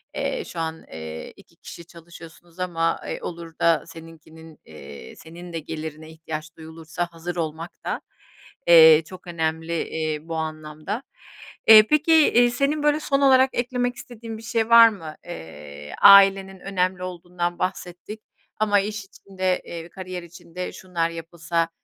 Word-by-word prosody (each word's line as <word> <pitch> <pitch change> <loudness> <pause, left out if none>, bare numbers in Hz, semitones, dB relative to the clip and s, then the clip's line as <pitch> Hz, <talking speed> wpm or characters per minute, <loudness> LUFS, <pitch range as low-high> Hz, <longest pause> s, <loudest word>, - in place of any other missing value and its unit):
eee, - - -2
şu 170 - -8
an, 160 0 -4
eee, 80 0 -8
2 - - -21
kişi 170 - -12
çalışıyorsunuz 170 0 -15
ama, 165 -2 -1
eee, - - -5
olur 170 -1 -7
da 165 -1 +3
seninkinin, 160 -1 -14
eee, 70 -4 -12
senin 170 +2 -12
de 165 - -3
gelirine 155 0 -7
ihtiyaç 160 0 -8
duyulursa 160 +2 -6
hazır 170 +1 -6
olmak 165 0 -4
da, - - -3 0.7
eee, 160 -2 +8
çok 185 +2 -13
önemli, 160 -1 -3 0.2
eee, 155 -1 -3
bu 165 - -4
anlamda. 155 - -5 0.6
Eee, 215 -1 +9
peki, 305 +2 +3
eee, 245 -6 +5
senin 285 +4 0
böyle 295 0 +3
son 280 -2 0
olarak 265 -1 +5
eklemek 245 0 -1
istediğin 230 -3 -9
bir 220 - -12
şey 225 -1 -1
var 230 0 +9
mı? 165 -8 -9
Eee, 75 -3 -10
ailenin 195 -1 +7
önemli 185 -1 -2
olduğundan 175 -1 -4
bahsettik 185 +3 -5 0.4
ama 210 -1 +3
iş 210 0 -4
içinde, 185 -2 -3 0.3
kariyer 185 -2 -7
içinde 175 +1 -8
şunlar 180 -4 -2
yapılsa 165 0 -3
170 Hz, 145 wpm, -23 LUFS, 160-200 Hz, 0.7 s, Eee